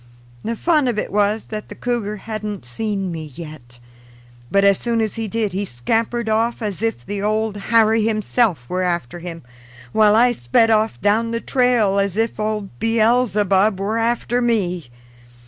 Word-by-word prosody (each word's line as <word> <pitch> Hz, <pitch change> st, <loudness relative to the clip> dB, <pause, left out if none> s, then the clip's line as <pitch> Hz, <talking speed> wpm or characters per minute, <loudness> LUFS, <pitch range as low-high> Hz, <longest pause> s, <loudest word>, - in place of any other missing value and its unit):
The 230 Hz, -, -2 dB
fun 305 Hz, +1 st, +2 dB
of 235 Hz, -3 st, -1 dB
it -, -, -2 dB
was 210 Hz, +1 st, +2 dB
that 215 Hz, 0 st, -5 dB
the -, -, -8 dB
cougar 230 Hz, -4 st, -2 dB
hadn't 210 Hz, -, -5 dB
seen 195 Hz, -, -3 dB
me 160 Hz, -2 st, -5 dB
yet, 150 Hz, -7 st, -10 dB, 0.7 s
but 200 Hz, 0 st, +3 dB
as 200 Hz, -1 st, +4 dB
soon 235 Hz, -1 st, -1 dB
as 220 Hz, -2 st, 0 dB
he 225 Hz, -1 st, -4 dB
did 215 Hz, -2 st, -2 dB
he 195 Hz, +2 st, -1 dB
scampered 225 Hz, -, -1 dB
off 225 Hz, +2 st, +1 dB
as 205 Hz, -2 st, -3 dB
if 225 Hz, -, -2 dB
the 205 Hz, -1 st, -4 dB
Old 215 Hz, 0 st, 0 dB
Harry 225 Hz, -1 st, +4 dB
himself 215 Hz, -, 0 dB
were 185 Hz, +1 st, -2 dB
after 175 Hz, -4 st, -2 dB
him, 170 Hz, -1 st, -8 dB, 0.5 s
while 210 Hz, -, +4 dB
I 245 Hz, +2 st, +5 dB
sped 225 Hz, -, +2 dB
off 215 Hz, -, +1 dB
down 220 Hz, +3 st, +2 dB
the 230 Hz, 0 st, -2 dB
trail 240 Hz, -7 st, +2 dB
as 200 Hz, 0 st, -1 dB
if 225 Hz, -1 st, -1 dB
old 215 Hz, -2 st, -2 dB
Beelzebub 215 Hz, -4 st, +2 dB
were 215 Hz, +3 st, -1 dB
after 240 Hz, +1 st, 0 dB
me. 180 Hz, -, 0 dB
215 Hz, 170 wpm, -20 LUFS, 195-230 Hz, 0.7 s, I